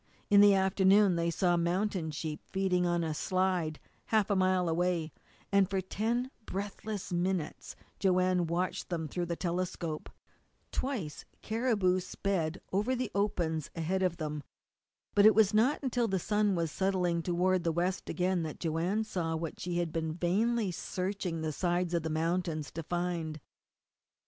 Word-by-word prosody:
In 200 0 +8
the 205 -1 +7
afternoon 190 0 +4
they 170 0 +1
saw 175 +1 +2
mountain 175 0 0
sheep 155 0 -4
feeding 185 -2 +1
on 175 -1 +1
a 160 -1 -1
slide 180 -2 0 0.3
half 215 -2 +2
a - - +3
mile 185 -1 +2
away, 170 -1 0 0.4
and 200 -1 +4
for 195 -1 0
ten 230 +7 -1 0.2
breathless 200 0 -4
minutes 175 -2 -2 0.2
Joanne 185 -2 +2
watched 175 +2 -2
them 165 -3 -2
through 175 +3 -3
the 170 - -2
telescope. 175 -3 -3 0.6
Twice 220 - -3 0.2
caribou 215 -5 +1
sped 180 -3 -2
over 210 +7 +1
the 250 -3 -3
opens 170 -7 0
ahead 175 +3 -1
of 180 -2 +1
them. 150 -1 -3 0.7
But 205 +1 +7
it 215 - +6
was 215 -1 +5
not 245 +8 +3
until 245 -3 +1
the 195 -2 0
sun 210 +1 +1
was 165 -2 -1
settling 180 -3 +1
toward 180 +1 +1
the 165 - +1
west 180 +3 -1
again 180 0 +1
that 155 -2 -5
Joanne 175 +6 0
saw 170 -6 -2
what 160 0 -4
she 175 -1 -2
had 170 -2 -1
been 160 -1 -1
vainly 205 +5 +1
searching 180 -1 -3
the 160 -1 -1
sides 175 +2 0
of 170 - +2
the 160 - -3
mountains 165 -1 -1
to 165 - -5
find. 170 -2 -2
180 Hz, 160 wpm, -31 LUFS, 170-195 Hz, 0.7 s, In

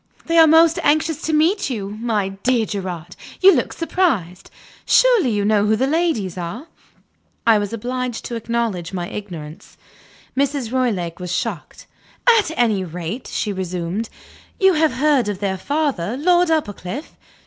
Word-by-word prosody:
They 330 0 +3
are 325 - +8
most 325 +1 +5
anxious 310 +1 +1
to 320 - -2
meet 320 +4 +2
you. 205 -6 -4
My 215 -2 -1
dear 225 +4 0
Gerard! 180 -5 -6 0.2
you 385 +1 +7
look - - 0
surprised. 265 - -1 0.3
Surely 480 - +4
you 205 -2 0
know 210 -1 +2
who 220 - +3
the 255 +5 +1
ladies 275 - 0
are?" 180 - -6 0.8
I 225 -2 +5
was 205 -1 -3
obliged 245 +1 -4
to - - -5
acknowledge 225 -6 -2
my 175 -2 -3
ignorance. 170 -7 -9 0.6
Mrs. 275 -3 -1
Roylake 205 -11 -1
was 180 -1 -5
shocked. - - -4 0.5
"At 410 - -1
any 220 -6 +2
rate," 180 +7 -6
she 210 - -2
resumed, 185 +3 -3 0.5
"you 385 -1 +5
have 315 -1 +2
heard 275 -5 +2
of 205 - -3
their 195 -1 -2
father, 270 - -1
Lord 350 +3 +3
Uppercliff?" 280 - -3
230 Hz, 150 wpm, -20 LUFS, 190-300 Hz, 0.8 s, are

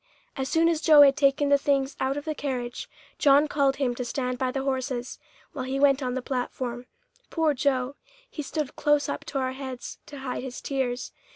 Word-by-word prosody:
As 265 -1 -3
soon 330 +1 +3
as 330 -2 +1
Joe 305 -3 +8
had 275 -1 +6
taken 280 0 +2
the 280 0 +5
things 275 -1 +1
out 265 +2 0
of 290 - -5
the 310 - -1
carriage, 250 -5 -4 0.3
John 285 +1 +5
called 280 -2 +2
him 265 -3 0
to 250 - -4
stand 250 0 -3
by 260 - 0
the 270 +1 -2
horses, 260 -2 -3 0.3
while 260 -4 -4
he 265 +1 -2
went 280 0 +4
on 250 -1 -2
the 260 - -3
platform. 250 -1 -4 0.4
Poor 320 -3 +1
Joe! 265 -1 0 0.3
He 450 -11 -6
stood 300 0 -4
close 295 -1 +2
up - - -4
to - - -4
our 260 -1 0
heads 260 -2 -7
to 290 - -9
hide 255 -2 -3
his 255 -1 -6
tears. 260 -3 -2
270 Hz, 205 wpm, -26 LUFS, 255-285 Hz, 0.4 s, Joe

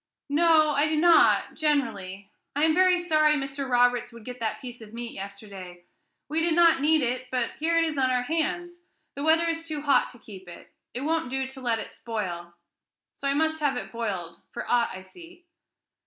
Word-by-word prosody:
"No, 310 0 +4
I 290 +1 +2
do 310 - 0
not, 335 +1 +4
generally. 210 -11 -2 0.2
I 290 - +1
am 320 0 +4
very 365 +1 +4
sorry 310 -3 +3
Mr. 275 -1 -4
Roberts 245 0 +2
would 230 -2 -13
get 250 0 -8
that 220 -2 -2
piece 245 -3 -10
of 220 0 -12
meat 235 0 -6
yesterday. 195 -3 -9 0.4
We 315 +3 0
did 330 -1 +2
not 335 -4 +5
need 310 0 +3
it, 255 +1 -2
but 250 -2 -1
here 330 +2 +1
it 330 - +4
is 310 -4 -2
on 260 -1 +2
our 250 -1 +1
hands; 345 +4 -3 0.3
the 280 - -7
weather 325 +2 +4
is 330 0 -2
too 300 -2 -4
hot 285 -2 +3
to - - -14
keep 190 -5 -13
it. 175 - -13 0.2
It 250 - -3
won't 320 -1 -1
do 265 +1 -1
to 265 0 -10
let 235 -2 0
it - - -7
spoil; 175 -7 -6 0.6
so 280 - -4
I 275 - +1
must 315 +1 +1
have 290 -3 0
it - - -6
boiled, 190 -8 -5
for - - -6
aught 240 -1 +2
I 185 0 -8
see." 345 - -16
270 Hz, 205 wpm, -26 LUFS, 230-315 Hz, 0.6 s, not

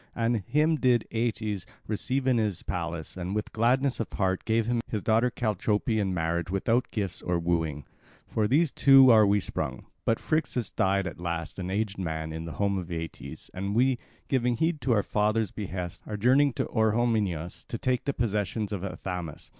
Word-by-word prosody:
And 115 0 +1
him 150 - +1
did 125 -5 +2
Aeetes 110 -4 -2 0.2
receive 130 +5 -1
in 130 -3 +3
his 105 -5 -1
palace, 85 -2 -4
and 95 +2 -4
with 105 - -3
gladness 125 +4 +2
of 115 - -3
heart 95 -1 0
gave 110 0 +2
him 120 0 0
his 105 -3 -3
daughter 115 +3 +3
Chalciope 110 0 0
in 100 -2 0
marriage 85 -1 -1
without 115 +6 +1
gifts 100 -5 -3
of 85 -1 -1
wooing. 80 -5 0 0.4
From 110 -2 0
those 145 +5 +3
two 135 -2 +7
are 110 -2 +7
we 100 +1 +3
sprung. - - -4 0.2
But 115 - +1
Phrixus 155 -8 -1
died 95 0 +1
at 95 - -6
last, 85 -1 -4
an 90 0 -3
aged 100 0 -2
man, 80 -3 -3
in 80 +1 -5
the 85 - -6
home 100 -1 0
of 90 - -7
Aeetes; 80 -1 -7
and 100 +2 -3
we, 125 +1 +3 0.3
giving 125 -3 +1
heed 160 +2 0
to 130 - 0
our 105 -3 +2
father's 105 -1 +1
behests, 90 -4 -5
are 105 - -4
journeying 130 +5 +4
to - - -1
Orehomenus 105 -7 0
to 115 - -4
take 125 +1 -1
the 140 - 0
possessions 105 -2 -1
of 100 -3 -3
Athamas. 90 -4 -5
105 Hz, 185 wpm, -28 LUFS, 90-120 Hz, 0.4 s, two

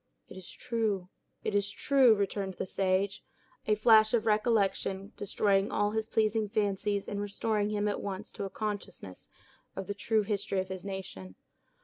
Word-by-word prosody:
"It - - -11
is 185 -2 -9
true—it 215 -5 -4
is 200 0 +1
true," 260 +1 +4
returned 200 -1 -2
the - - -3
sage, 190 +1 0 0.4
a 215 - +4
flash 220 +1 +6
of 225 -1 0
recollection 210 -2 +1
destroying 200 0 +1
all 205 0 +1
his 220 +1 -2
pleasing 220 0 +1
fancies, 205 0 -1
and 200 0 -3
restoring 205 +1 -1
him 210 0 0
at 205 - -1
once 200 0 -5
to 200 - -5
a - - -4
consciousness 205 - -6 0.5
of 195 - -4
the 205 - -3
true 215 +1 +1
history 200 -2 -1
of 185 0 -3
his 185 -1 -6
nation. 185 - -7
205 Hz, 160 wpm, -30 LUFS, 195-215 Hz, 0.5 s, flash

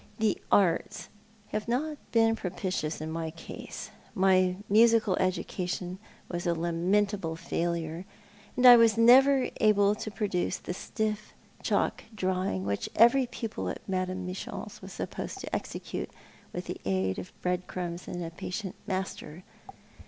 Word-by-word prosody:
The 220 -3 +1
Arts 185 -5 +2 0.4
have 215 +1 -3
not 290 +5 -1
been 225 -1 +4
propitious 180 -5 -3
in 160 0 -4
my 165 0 -3
case. 165 +1 -8 0.2
My 185 -1 +4
musiotil 225 -2 +5
education 185 0 -2 0.3
was 175 0 -3
a 170 - +2
lamentable 175 +2 0
failure; 170 0 -2 0.5
and 250 - +3
I 245 -1 +11
was 230 -1 +5
never 260 +3 +6
able 205 -2 +4
even 210 - -3
to - - -3
produce 205 -4 -1
the - - -5
stiff 215 +2 -3 0.3
chalk - - 0
drawing 185 - -1
which 100 0 -2
every 240 +3 +6
pupil 225 -2 -4
at - - -7
Madame 185 -1 -2
M.'s 185 +1 -6
was - - -9
supposed - - -5
to - - -4
execute, - - -5 0.4
with - - -5
the - - -6
aid 95 0 0
of 185 - -8
bread 180 0 -1
crumbs 175 -1 -5
and 175 -1 -4
a 165 - -5
patient 180 +3 -5
master. 185 -3 -4
185 Hz, 145 wpm, -29 LUFS, 175-215 Hz, 0.5 s, I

